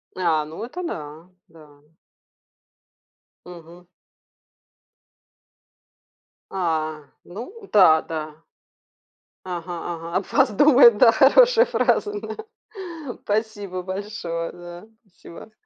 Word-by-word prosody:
А, 165 -4 +1
ну, 160 +7 -8
это 355 +9 -7
да, 155 - -7 0.2
да. 150 -3 -19 1.6
Мгм. 175 0 -14 2.7
А, 155 -4 -2 0.2
ну 375 - -11
да, 160 -6 +6
да 155 -1 -7 1.0
Ага 175 -1 -6 0.2
ага, 165 +1 -8
об 190 - -3
вас - - +3
думают, 245 -1 +6
да, 230 - +7
хорошая 475 - +5
фраза, 415 -3 0
да. 435 - -8 0.8
Спасибо 205 -3 -3
большое, 185 -3 -5
да. 175 +3 -12 0.2
Спасибо. 195 0 -15
180 Hz, 90 wpm, -22 LUFS, 165-220 Hz, 2.7 s, да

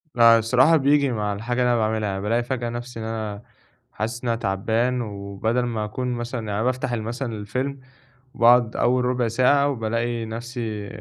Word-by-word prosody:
فالصراحة 120 +6 +5
بييجي 140 -1 +3
مع 105 -3 -1
الحاجة 120 +5 -3
اللي 125 0 +3
أنا - - +2
باعملها، 110 -1 0
يعني 95 0 -3
بالاقي 115 +4 0
فجأة 120 -1 -3
نَفْسي 120 0 -6
إن 110 - -5
أنا 110 -2 -4 0.5
حاسس 115 +3 -4
إن 120 - -1
أنا 115 - +1
تعبان 115 +5 0
وبَدَل 105 +3 -2
ما 115 -3 -2
أكون 125 +4 -4
مثلًا 120 +1 -4
يعني 110 -1 -5
أنا 105 +2 0
بافتح 130 0 -1
ال 115 -2 -2
مثلًا 120 +2 -4
الفيلم 130 +7 -3 0.5
وباقعُد 120 -1 +4
أول 125 0 +2
رُبع 125 -1 +1
ساعة، 130 +5 +3
وبالاقي 115 -1 -2
نَفْسي 115 -2 -5
115 Hz, 180 wpm, -23 LUFS, 110-125 Hz, 0.5 s, فالصراحة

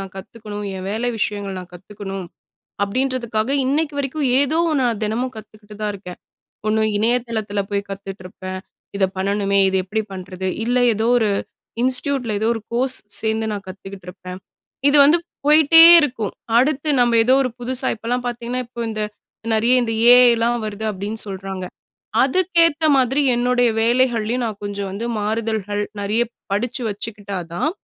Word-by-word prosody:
நான் 195 -1 -8
கத்துக்கணும், 210 +1 -8
என் 185 0 -6
வேலை 230 +3 -1
விஷயங்கள் 205 -2 -2
நான் 180 -1 -10
கத்துக்கணும் 195 0 -7 0.6
அப்பிடின்றதுக்காக, 235 0 -1 0.2
இன்னைக்கு 295 +2 0
வரைக்கும் 280 +1 -2
ஏதோ 295 +4 +1 0.2
நான் 235 -4 0
தினமும் 245 +4 -2
கத்துக்கிட்டு 215 -1 -13
தான் 210 -1 -1
இருக்கேன். 180 -2 -10 0.5
ஒண்ணு 220 0 +2 0.2
இணையதளத்தில 225 -2 -1
போய் 200 0 -2
கத்துகிட்டிருப்பேன். 185 -1 -7 0.4
இத 195 - 0
பண்ணணுமே! 200 +1 0
இத 190 - 0
எப்பிடி 215 +4 -2
பண்ணுறது? 185 0 -6 0.2
இல்ல, 245 +2 +1 0.2
எதோ 220 +2 -1
ஒரு 220 -3 +1 0.5
இன்ஸ்டிடியூட்டில 255 -3 +2
எதோ 220 - 0
ஒரு 225 - -5
கோர்ஸ் 255 +2 +2 0.2
சேர்ந்து 220 0 -1
நான் 200 -2 -5
கத்துக்கிட்டுருப்பேன். 185 -1 -9 0.5
இது 290 - +3
வந்து 305 +5 +5 0.3
போயிட்டே 315 +2 +7 0.2
இருக்கும். 245 -8 -2 0.2
அடுத்து 285 +3 +1
நம்ம 240 -1 +3
ஏதோ 255 +3 +3
ஒரு 255 - -1
புதுசா 255 +2 -1
இப்பல்லாம் 245 +3 -3
பார்த்தீங்கன்னா, 240 +1 -3
இப்ப 235 -1 -6
இந்த 215 -1 -3 0.5
நிறைய 235 +3 +3
இந்த 225 -1 -2 0.2
ஏ.ஐ. 250 -1 +7
லாம் 235 -1 0
வருது 215 +1 -5
அப்பிடின்னு 205 +3 -4
சொல்றாங்க. 190 -1 -6 0.6
அதுக்கேத்த 330 +1 +2
மாதிரி 265 +2 +2
என்னுடைய 245 0 +2
வேலைகள்லயும் 240 0 +1
நான் 210 -2 -6
கொஞ்சம் 200 -1 -4
வந்து 205 +4 -5
மாறுதல்கள் 210 -1 -2 0.2
நிறைய 210 +4 +1 0.3
படிச்சு 245 +4 -2
வச்சுக்கிட்டா 205 -1 -5 0.2
தான், 305 - 0
220 Hz, 145 wpm, -20 LUFS, 200-250 Hz, 0.6 s, போயிட்டே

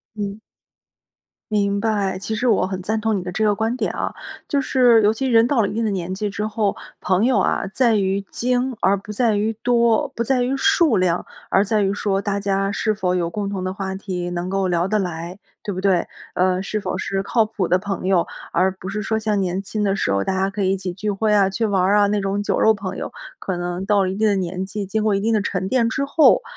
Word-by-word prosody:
嗯。 205 0 -4 1.1
明 200 -1 +1
白， 200 -4 0
其 220 +3 -4
实 230 +4 -1
我 225 -6 +3
很 190 0 -4
赞 215 +4 -1
同 220 -1 0
你 190 - -3
的 180 0 -5
这 220 - -2
个 210 -1 +3
观 220 +3 -1
点 - - -1
啊。 - - -3 0.3
就 285 - +1
是 250 -4 +4
尤 210 - +5
其 265 +4 -2
人 230 -2 +5
到 245 -3 +2
了 200 - 0
一 - - -5
定 225 +2 -1
的 215 - +1
年 185 -2 -3
纪 210 +2 -2
之 205 +1 -3
后， 210 -1 -1 0.2
朋 185 +4 +1
友 255 0 +3
啊 - - +1
在 235 -4 +3
于 195 -1 +1
精 250 +1 0
而 195 +1 +4
不 210 +2 -8
在 225 0 +2
于 215 +2 0
多， 235 -2 +3
不 235 - -1
在 250 +2 +1
于 250 +2 0
数 300 - +3
量， 180 -1 +1 0.2
而 195 - +3
在 215 +1 +1
于 195 0 +1
说 200 -1 0
大 200 0 -2
家 195 0 0
是 215 +1 0
否 185 -3 -1
有 170 -2 0
共 205 +2 -3
同 195 -2 -4
的 185 - -2
话 190 0 -4
题， 185 -2 -4
能 175 +1 -3
够 195 -1 0
聊 175 0 +1
得 215 +2 +1
来， 175 -1 -4 0.2
对 205 - -3
不 185 - -3
对？ 190 -3 +2 0.3
呃， 185 0 +2
是 215 - -2
否 185 - -3
是 195 0 -2
靠 220 +2 +2
谱 210 -4 -2
的 180 - +3
朋 195 -1 -4
友， 185 -3 +3 0.3
而 185 +2 +3
不 185 0 -8
是 210 +2 -3
说 220 +2 0
像 215 -2 0
年 185 +1 -1
轻 210 +2 -3
的 200 -1 +1
时 190 - 0
候， 100 - +1
大 190 - -1
家 195 +1 +1
可 200 0 -3
以 190 - +2
一 - - +1
起 185 -1 -4
聚 205 +4 -3
会 210 +2 0
啊， 200 -2 +4
去 210 +4 -2
玩 200 -4 +2
儿 195 +3 +3
啊， 205 -1 +5
那 205 0 +1
种 195 +1 -1
酒 - - 0
肉 220 0 +5
朋 190 -2 -5
友。 - - -4 0.3
可 185 - -3
能 175 +2 -4
到 205 -1 +3
了 185 - -1
一 190 - -4
定 215 +1 +2
的 200 - +2
年 185 0 -3
纪， 205 +1 -4
经 215 +3 -1
过 215 -1 +2
一 195 - 0
定 225 +2 +1
的 215 - +3
沉 190 -2 -2
淀 240 -3 +2
之 275 +5 -1
后， 290 +2 +4
200 Hz, 280 characters per minute, -21 LUFS, 190-220 Hz, 1.1 s, 尤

